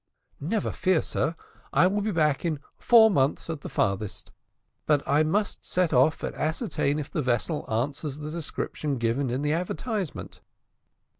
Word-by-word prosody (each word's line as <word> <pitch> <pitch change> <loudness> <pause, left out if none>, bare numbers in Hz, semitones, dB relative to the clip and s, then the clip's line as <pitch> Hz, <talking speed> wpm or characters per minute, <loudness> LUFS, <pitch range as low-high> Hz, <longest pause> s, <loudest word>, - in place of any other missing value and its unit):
"Never 190 +8 -1
fear, 185 -3 +1
sir, 165 - -1 0.4
I - - +4
will 200 +3 +1
be 215 - -1
back 150 -6 +1
in 160 -4 -1 0.2
four 225 -2 +6
months, 140 0 +1
at 155 -3 -6
the - - -7
furthest; 100 +1 -2 0.6
but 145 -2 +2
I 145 +3 +4
must 200 +7 0
now - - -46
set 180 -3 0
off 135 +5 +3
and - - -3
ascertain 150 -2 -1
if 150 -2 -5
the 155 - -1
vessel 130 +4 -1
answers 140 +5 -2
the 150 0 -6
description 150 -3 -3
given 120 +3 0
in 130 +4 -2
the 150 +1 +1
advertisement." 180 - -4
150 Hz, 165 wpm, -26 LUFS, 140-170 Hz, 0.6 s, four